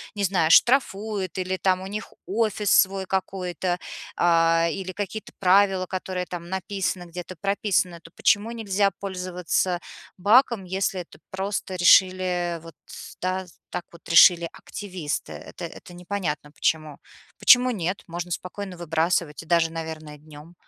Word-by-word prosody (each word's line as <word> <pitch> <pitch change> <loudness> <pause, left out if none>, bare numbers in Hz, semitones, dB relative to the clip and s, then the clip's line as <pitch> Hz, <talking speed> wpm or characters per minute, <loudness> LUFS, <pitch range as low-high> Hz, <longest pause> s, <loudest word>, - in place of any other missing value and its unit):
не 205 - -2
знаю 180 -4 +2
штрафует, 210 - +3
или 185 0 -2
там 185 -1 +1
у 190 - -6
них 210 +2 -6
офис 210 -1 0
свой 195 0 +4
какой-то, 185 -2 -2 0.4
а, 165 -1 +4
или 185 +2 -4
какие-то 205 +1 -5
правила, 190 0 +4
которые 185 0 -4
там 175 -1 -7
написаны, 190 -1 -2
где-то 180 +1 -7
прописаны, 195 -3 0
то 165 - -15
почему 210 +3 +2
нельзя 205 -3 0
пользоваться 180 -2 -1 0.4
баком, 215 +1 +4
если 190 0 -1
это 170 - -14
просто 190 0 -3
решили 180 -1 +4
вот 165 -1 -13 0.5
да 185 +1 -1 0.3
так 180 -1 -3
вот 170 - -16
решили 170 0 +7
активисты. 185 -7 -5
Это - - -8
это 170 +1 -11
непонятно 175 -5 -4
почему. 155 -1 -1 0.4
Почему 250 0 +6
нет? 185 -2 -3
Можно 175 +1 -5
спокойно 185 +1 -5
выбрасывать 165 -1 -1
и - - -17
даже, 170 -1 +3
наверное, 160 -2 -7
днём. 150 +2 -14
185 Hz, 135 wpm, -24 LUFS, 170-195 Hz, 0.5 s, решили